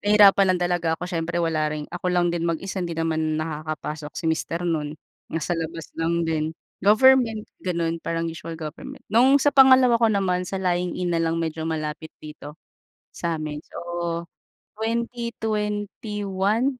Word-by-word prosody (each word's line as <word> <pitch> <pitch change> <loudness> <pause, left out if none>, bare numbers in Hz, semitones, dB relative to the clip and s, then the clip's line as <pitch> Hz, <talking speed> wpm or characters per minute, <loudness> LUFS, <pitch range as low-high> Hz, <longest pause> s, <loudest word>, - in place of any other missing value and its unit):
Nahirapan 205 -1 +6
lang 180 - -3
talaga 175 -1 0
ako 180 - -5
siyempre 170 -1 -2
wala 160 -3 +1
rin 150 -1 -4
ako 175 +1 -4
lang 175 -1 +2
din 170 0 -1
mag-isa 190 +4 -3
di 170 -2 -3
naman 160 -1 0
nakakapasok 155 -1 -4
si - - -5
mister 165 +2 -1
no'n. 155 -3 -1 0.3
Nasa 165 +2 -2
labas 165 -1 -4
lang 170 +1 +1
din. 160 0 -1 0.2
Government, 225 +1 +5 0.2
ganon 170 -2 -1
parang 165 0 -2
usual 165 0 -5
government. 155 -1 -8
Nung 260 +5 +6
sa 285 +1 +3
pangalawa 260 -3 +7
ko 230 - +5
naman, 185 -4 0
sa 195 - -3
lying-in 180 -1 -1
na 165 - +1
lang 165 0 0
medyo 160 -1 -2
malapit 155 0 -3 0.2
dito 150 0 -9 0.6
sa 170 -2 -2
amin. 150 -1 -5
So, - - -9 1.0
2021. 215 -2 -2
170 Hz, 150 wpm, -24 LUFS, 160-205 Hz, 1.0 s, pangalawa